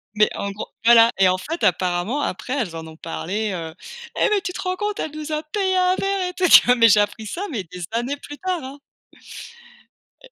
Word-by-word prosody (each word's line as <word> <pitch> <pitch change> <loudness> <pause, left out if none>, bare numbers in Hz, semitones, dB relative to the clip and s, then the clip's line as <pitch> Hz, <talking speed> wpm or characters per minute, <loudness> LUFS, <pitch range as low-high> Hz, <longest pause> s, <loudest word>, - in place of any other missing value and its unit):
Mais 210 0 +4
en 200 - -3
gros 200 - -7 0.2
voilà 230 0 +7
et 190 - +6
en 185 0 +2
fait 320 - -6
apparemment 180 - 0
après 250 +2 -3
elles 225 - -2
en 160 0 -6
ont 160 - -12
parlé. 200 +6 -3
Heu: 165 -3 -5 0.5
«Eh - - +3
mais 420 -2 +1
tu 370 -2 -5
te - - -5
rends 370 0 -2
compte 415 +2 -3
elle 310 - -3
nous 310 0 -7
a 305 0 -2
payé 380 +4 -1
un 365 0 +3
verre 390 -1 -1
et - - -8
tout», 365 0 +1
tu - - +9
vois? 245 - +5
Mais 230 -2 +6
j'ai 210 0 +6
appris 215 +1 -1
ça, 335 - -5
mais 220 -8 -3
des 180 +1 -9
années 240 +5 -2
plus 290 +1 -10
tard, 365 -4 -3
hein 270 +2 -9 1.4
et - - -16
250 Hz, 240 wpm, -22 LUFS, -, 1.4 s, tu